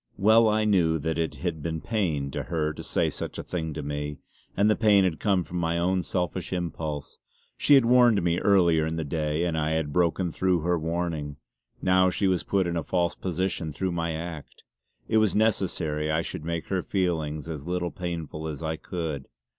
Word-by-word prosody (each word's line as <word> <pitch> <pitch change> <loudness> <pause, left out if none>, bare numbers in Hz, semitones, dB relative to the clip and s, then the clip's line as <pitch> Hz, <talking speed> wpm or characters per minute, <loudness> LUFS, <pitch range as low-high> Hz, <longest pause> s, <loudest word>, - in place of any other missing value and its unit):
Well 110 +3 +5
I 110 0 +2
knew, 85 -6 +3
that 80 +2 -2
it 80 -1 -1
had 85 -4 -3
been 80 +1 -3
pain 80 -10 -1
to - - -3
her 80 -3 -1
to - - -8
say - - 0
such - - -5
a - - -4
thing 80 -3 -3
to 75 - -4
me; 75 0 -4 0.4
and 100 +2 +4
the 105 - +4
pain 105 -3 +5
had 90 -4 0
come 95 -4 +2
from 90 +1 -5
my 85 0 0
own 90 +2 +1
selfish 90 +1 -2
impulse. 80 -5 -4 0.4
She 145 - +5
had 135 -3 +5
warned 120 -5 +5
me 85 0 +1
earlier 85 -5 +4
in 80 - -2
the 80 - -2
day, 75 +1 -1
and 85 -2 -1
I 80 0 0
had 80 -2 -1
broken 90 +1 +1
through 90 0 +1
her 85 +1 +1
warning. 80 -3 -2 0.5
Now 95 0 +4
she 100 - -1
was 95 -2 +2
put 95 -2 +1
in 85 0 -2
a - - 0
false 85 +1 0
position 90 -2 -2
through 90 +6 -2
my 85 -1 -1
act; 80 -2 -7 0.4
it 110 - +2
was 110 -4 +3
necessary 85 -8 0
I 80 +1 +1
should - - -6
make 85 0 -4
her 95 -2 0
feelings 80 -6 -1
as 75 -3 -6
little 90 -1 -1
painful 80 -3 -5
as 75 0 -5
I 80 0 -2
could. 80 -7 -4
85 Hz, 205 wpm, -26 LUFS, 80-95 Hz, 0.5 s, Well